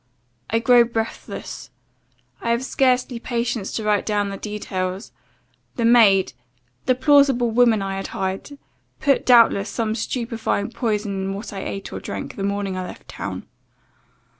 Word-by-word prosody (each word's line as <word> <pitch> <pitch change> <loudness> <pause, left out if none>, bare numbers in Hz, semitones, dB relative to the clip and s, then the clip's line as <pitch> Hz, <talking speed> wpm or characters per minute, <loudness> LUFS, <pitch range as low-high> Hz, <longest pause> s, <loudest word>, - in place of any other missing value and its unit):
I 225 - +2
grow 240 +1 +6
breathless. 230 -1 -5 0.7
I 235 - -2
have 235 +2 +1
scarcely 255 -2 +1
patience 235 -3 -2
to 220 - -3
write 210 -1 +2
down 205 -1 0
the 195 - -5
details. 190 -2 -4 0.6
The 235 - 0
maid 220 -5 +5 0.5
the 255 - +4
plausible 265 -3 +4
woman 225 -3 +4
I 195 0 -3
had 195 - -4
hired 190 +9 -4 0.4
put, 280 -2 +1
doubtless, 230 -5 +5
some 220 +1 -1
stupefying 230 -2 -2
potion 210 -5 -2
in 190 0 -2
what 205 +2 -7
I 195 - -5
ate 195 - -6
or - - -4
drank, - - -6
the - - -6
morning 200 -1 -2
I 185 0 -4
left - - -12
town. - - -6
225 Hz, 150 wpm, -22 LUFS, 200-240 Hz, 0.7 s, grow